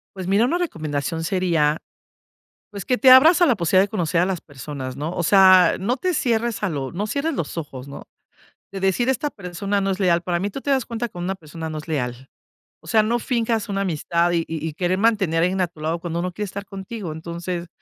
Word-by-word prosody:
Pues 185 -2 -6
mira, 200 +5 +3
una 345 +7 0
recomendación 160 - -3
sería, 165 -4 +1 0.9
pues, 200 -3 -7
que 250 - +2
te 260 0 +5
abras 320 +8 +8
a - - +7
la 250 - +4
posibilidad 185 +1 +3
de - - -5
conocer 175 -4 0
a - - +4
las 190 -2 -2
personas, 135 -2 -7
¿no? 155 +4 -4
O 175 - -1
sea, 185 -1 +6
no 240 +8 -1
te 365 -1 -1
cierres 235 -6 0
a 200 - 0
lo 135 -3 -3
no 200 +5 -3
cierres 285 +6 -1
los 165 - -4
ojos, 135 -4 -7
¿no?, 140 - -9 0.7
de 195 - -5
decir 195 +7 +1
esta 280 +3 0
persona 200 0 -3
no 195 0 0
es 190 - -3
leal. 175 -3 +3
Para 175 -1 -1
mí, 200 +3 -2
tú 270 - -7
te 285 - -1
das 265 -3 +1
cuenta 235 0 -4
que 180 - -13
una 185 +2 -2
persona 160 -1 -8
no 155 - -5
es 155 - -8
leal, 130 -3 -3 0.5
o - - -17
sea, 220 -2 +4
no 235 +3 +1
finjas 230 -2 -1
una 195 0 -1
amistad 170 -1 0
y 165 -1 +1
y 160 -1 -4
querer 180 +2 0
mantener 200 -7 +2
a - - +5
alguien 185 +1 0
a 180 - +2
tu 160 -2 -20
lado 165 +2 -1
cuando 170 0 -3
no 180 0 -2
quiere 210 +2 -3
estar 200 +1 -7
contigo. 195 -2 -7
Entonces 170 +2 -5
185 Hz, 235 wpm, -22 LUFS, 165-215 Hz, 0.9 s, abras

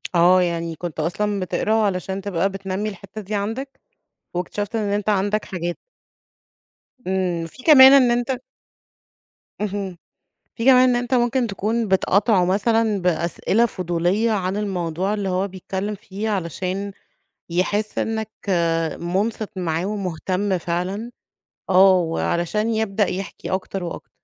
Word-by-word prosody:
آه، 180 +2 +6
يعني 170 -2 -2
كنت 165 -1 -6
أصلًا 200 +6 -1
بتقرا 190 +3 -1
علشان 195 -3 0
تبقى 195 -1 0
بتنمّي 195 +1 -3
الحتّة 195 +1 -9
دي 210 +1 -4
عندك 225 +7 -4 0.5
واكتشفت 200 +5 -3
إن 215 -2 -1
أنت 205 +1 0
عندك 205 +1 +1
حاجات. 175 -2 -4 1.3
إمم، 180 -3 0
في 255 +10 -15
كمان 270 -4 +9
إن 260 -3 +6
أنت 245 +1 0 1.2
اهم. 200 -3 -3 0.6
فيه 230 - -3
كمان 255 0 +6
إن 245 - +2
أنت 245 +1 -2
ممكن 245 0 +2
تكون 220 +2 -1
بتقاطعه 195 +1 +3
مثلًا 210 +2 +1
بأسئلة 180 +6 +1
فضولية 185 +2 0
عن 190 -2 -1
الموضوع 190 -2 -2
اللي 205 -2 -2
هو 185 +2 0
بيتكلِّم 190 +2 -4
فيه 205 +2 -5
علشان 190 +1 -3 0.6
يحس 205 +5 -1
إنّك 220 -1 -1 0.7
مُنصِت 200 +5 -1
معاه 170 -1 -1
ومهتم 190 -1 -1
فعلًا، 180 +7 -3 0.6
آه، 190 +1 +7
وعلشان 175 +5 0
يبدأ 215 -2 +1
يحكي 190 +1 -5
أكتر 190 0 -3
وأكتر. 170 - -7
195 Hz, 125 wpm, -22 LUFS, 180-215 Hz, 1.3 s, كمان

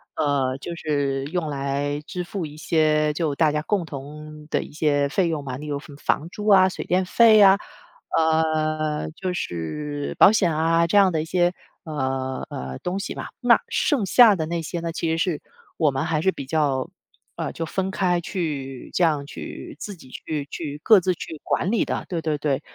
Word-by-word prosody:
呃， 140 -3 0
就 170 - -6
是 140 -4 -1
用 165 +2 -2
来 140 +1 -2
支 180 -1 -4
付 175 -1 -4
一 150 0 -9
些 155 -1 +2
就 155 -2 -1
大 155 +1 +3
家 150 0 -1
共 200 -1 0
同 150 +1 -9
的 - - +1
一 - - -10
些 145 -2 +1
费 180 +3 +1
用 155 -3 -2
嘛。 130 -2 -5
例 150 - -8
如 145 -1 -3
什 145 - -13
么 140 - -12
房 150 +2 -1
租 210 +3 -7
啊， 190 -1 +7
水 - - -6
电 185 +1 +2
费 215 +2 +6
啊， 195 0 +8 0.6
呃， 155 -1 +1
就 180 +3 -4
是 145 - -4
保 - - +9
险 180 -7 +2
啊， 165 +1 +3
这 205 +5 +4
样 195 -2 +5
的 160 - 0
一 - - -7
些， 175 +1 +2 0.3
呃， 130 -3 -3
呃， 65 0 -5
东 180 +2 -2
西 200 - -5
吧。 - - -6
那 245 -2 +5
剩 280 - +1
下 220 +1 +7
的 160 -3 -2
那 170 +1 -2
些 165 +2 -4
呢， 170 - -3
其 165 0 -2
实 165 - 0
是 165 -3 -1 0.4
我 150 - +3
们 135 +3 -2
还 160 -2 0
是 190 +2 +3
比 140 - -7
较， 140 -3 0 0.5
呃， - - -3
就 165 - -3
分 190 +3 -2
开 180 -2 +1
去 145 -8 -4
这 - - +2
样 150 -4 +2
去 140 - -8
自 205 -2 -6
己 130 -6 -16
去 150 +1 -5
去 150 -2 -5
各 220 -3 +7
自 185 0 0
去 160 -1 -8
管 185 - 0
理 230 - +2
的， - - -3
对 170 -3 -2
对 155 -2 -1
对。 140 -2 -1
155 Hz, 220 characters per minute, -23 LUFS, 145-175 Hz, 0.6 s, 保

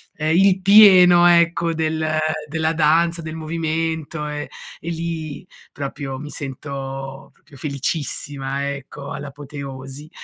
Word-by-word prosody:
ehm, 155 +1 0
il 190 +1 +4
pieno, 185 -3 +8
ecco, 170 -1 +3
del 160 0 -1 0.4
della 160 +1 0
danza, 165 +2 +2
del 160 0 -6
movimento 160 -1 -3
e 150 0 -5 0.3
lì 165 -2 -5 0.3
proprio 140 -1 -5
mi 150 +2 -8
sento 135 -1 -6
proprio 140 - -20
felicissima, 140 -1 -3
ecco, 140 0 -9
all'apoteosi. 140 0 -8
155 Hz, 105 wpm, -21 LUFS, 140-165 Hz, 0.4 s, pieno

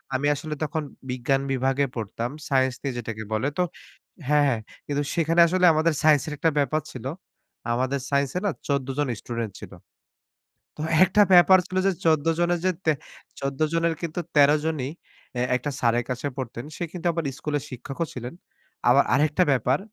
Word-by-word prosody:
আমি 140 +3 +1
আসলে 150 +2 -5
তখন 155 +1 -2 0.3
বিজ্ঞান 130 +2 0
বিভাগে 135 +2 +1
পড়তাম। 115 +2 -3 0.2
সাইন্স 130 -1 +2
নিয়ে 135 -2 -3
যেটাকে 110 -2 -5
বলে। 110 +5 0
তো 180 - +3 0.7
হ্যাঁ, 150 -1 +4
হ্যাঁ। 120 - +1 0.3
কিন্তু 145 0 -1
সেখানে 165 0 +2
আসলে 180 +2 +1
আমাদের 160 +1 +2
সাইন্স 150 -3 +5
এর - - -4
একটা 165 - +2
ব্যাপার 145 +2 +1
ছিল। 125 - -9 0.7
আমাদের 130 +3 0
সাইন্স 140 -1 +1
এ - - +3
না - - +2 0.2
১৪ 140 -2 0
জন 145 - +1
স্টুডেন্ট 115 -4 -4
ছিল। - - -9 1.1
তো - - -5 0.2
একটা 195 +3 +4
ব্যাপার 180 +1 +8
ছিল 185 - -4
যে, 195 - +4
১৪ 160 -1 +3
জনের 175 0 +2
যে, 185 - +4
তে 160 - +5 0.5
১৪ 135 0 -3
জনের 165 0 +2
কিন্তু 170 0 -3 0.2
১৩ 145 -1 +7 0.2
জনই 145 -5 -1 0.5
এ - - +1
একটা 130 +3 -2
স্যারের 120 0 +2
কাছে 125 +3 -2
পড়তেন 120 0 -5
সে - - -4
কিন্তু 175 -2 -8
আবার 165 -1 -2 0.2
স্কুলের 145 -2 -2
শিক্ষকও 135 +6 -4
ছিলেন। 125 0 -6 0.6
আবার - - +6
আরেকটা 150 +6 +3
ব্যাপার 130 +1 +2
140 Hz, 175 wpm, -25 LUFS, 130-160 Hz, 1.1 s, ব্যাপার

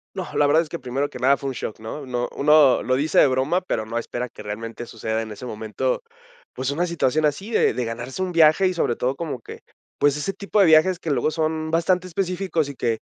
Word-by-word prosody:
No, 185 - -3
la 145 - +4
verdad 160 +3 +4
es 155 - -13
que 170 - -5
primero 135 +3 -2
que - - -9
nada 135 +2 +4
fue 140 - -4
un - - -4
shock, 110 - -6
¿no? 125 +6 -7
No 120 -1 -2
uno 150 -2 +5
lo 130 - +1
dice 145 +4 +2
de - - +7
broma, 135 +8 +1
pero 110 -11 -2
no 115 +2 -4
espera 120 +1 -4
que - - -12
realmente 115 +3 -6
suceda 110 0 -3
en 110 -1 -7
ese 125 +5 -8
momento, 115 - -2 0.5
pues, 130 +2 -2
una 175 +5 0
situación 155 -2 +1
así 190 +10 -2
de - - +3
de 125 0 -2
ganarse 120 +8 -5
un 185 - -3
viaje 165 +3 +5
y, 185 - 0
sobre 120 -8 0
todo, 130 +2 -1
como 155 -7 -4
que, - - -10 0.4
pues, 145 0 +3
ese 195 +6 -2
tipo 200 +2 -1
de 195 - +7
viajes 165 +3 +5
que 160 - -3
luego 135 +3 +1
son 155 0 -2
bastante 180 +2 +1
específicos 180 -3 -1
y 140 - -8
que, 115 -3 -1
145 Hz, 245 wpm, -23 LUFS, 125-170 Hz, 0.5 s, de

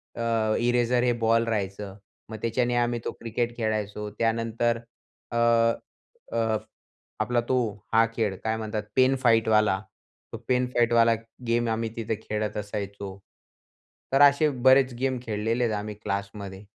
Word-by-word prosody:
अ, 115 -2 0
eraser 120 0 +2
हे 125 - +3
ball 115 +1 +4
राहायचं. 100 -2 -3 0.3
मग 110 - -6
त्याच्याने 120 +1 0
आम्ही 120 0 +1
तो - - -1
क्रिकेट 115 +1 -2
खेळायचो. 105 -2 -2
त्यानंतर 115 +1 +1 0.5
अ, 120 - -2 0.9
अ, 110 -1 +1 0.6
आपला 120 -1 +1
तो 130 - +3 0.4
हा 115 0 +6
खेळ 105 -4 0
काय 110 0 0
म्हणतात, 110 -1 -3
पेन 130 +1 +4
फाईटवाला, 110 -4 +4 0.5
तो - - -3
पेन 125 0 +2
फाईटवाला 115 -1 +4 0.3
गेम 120 0 +1
आम्ही 115 0 -1
तिथे 115 -1 -2
खेळत 105 -1 -3
असायचो. 100 -2 -5 1.0
तर 135 - +5
असे 145 +2 +6 0.2
बरेच 130 -1 +6
गेम 130 0 0
खेळलेले 115 +2 -1
आहेत 115 -2 +1
आम्ही 105 +1 -5
क्लासमध्ये. 100 0 -5
115 Hz, 135 wpm, -26 LUFS, 105-120 Hz, 1.0 s, हा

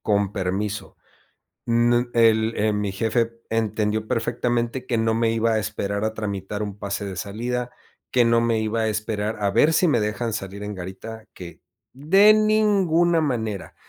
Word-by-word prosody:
Con 100 -2 +1
permiso. 100 +1 -3 0.7
Nu 120 +1 +2
el 115 -1 +3
eh, 110 +1 +1
mi 105 -1 -2
jefe 115 +3 -1
entendió 110 -1 -1
perfectamente 120 +2 -1
que 120 - 0
no 115 0 +1
me 115 0 +1
iba 115 0 +1
a - - +2
esperar 100 0 -3
a 110 0 -1
tramitar 100 -1 -4
un 105 -1 -5
pase 100 0 -4
de 95 -2 -6
salida, 120 +6 -3 0.4
que 125 -1 +4
no 115 0 +3
me 115 -1 +1
iba 110 +1 -1
a 110 - +1
esperar 110 0 -2
a 100 - +2
ver 145 +10 +4
si 175 +2 +3
me 120 -7 +2
dejan 110 +2 -2
salir 100 -1 -5
en 105 0 -5
garita 95 +5 -8
que 85 -2 -10 0.3
de 195 +10 +5
ninguna 200 -6 +3
manera. 110 -9 -3
110 Hz, 170 wpm, -23 LUFS, 105-120 Hz, 0.7 s, de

